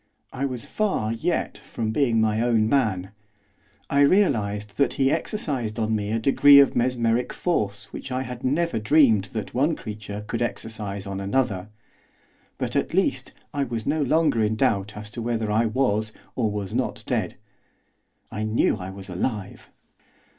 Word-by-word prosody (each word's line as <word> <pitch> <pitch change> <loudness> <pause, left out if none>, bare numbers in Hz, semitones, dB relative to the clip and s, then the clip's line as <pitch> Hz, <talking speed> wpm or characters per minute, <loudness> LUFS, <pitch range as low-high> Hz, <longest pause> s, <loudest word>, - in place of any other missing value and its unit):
I 135 - -2
was 125 -4 -4
far, 190 - -1
yet, 115 - -2
from 110 -2 -4
being 120 -2 +2
my 110 0 +2
own 115 -2 +2
man; 105 -8 +1 0.8
I 140 - +1
realised 105 - +2
that 140 - +2
he 135 0 +2
exercised 145 - -2
on 110 -1 0
me 105 -1 -2
a 115 - +1
degree 140 +4 +7
of 140 - +4
mesmeric 120 -1 +1
force 100 - -2
which 135 - -7
I 130 +1 -1
had 125 -1 -8
never 150 -1 +1
dreamed 110 -4 +4
that 110 -3 -4
one 145 +6 +2
creature 105 -1 -7
could 115 +2 -3
exercise 105 -4 -4
on 100 -1 -4
another; 100 -2 -1 0.9
but, - - -3
at - - 0
least, - - 0 0.2
I 145 - 0
was 115 -4 -4
no 155 +2 +1
longer 145 -5 +2
in 105 +1 +1
doubt 105 -5 0
as 105 0 -8
to 115 - -6
whether 115 -2 -1
I 110 +2 +2
was 110 -3 0 0.2
or 115 -4 +1
was 105 -2 -4
not - - -2
dead. - - -1 1.0
I 105 - -4
knew 110 0 +1
I 95 -1 -6
was 95 0 -9
alive. 100 +2 -4
115 Hz, 165 wpm, -24 LUFS, 105-130 Hz, 1.0 s, degree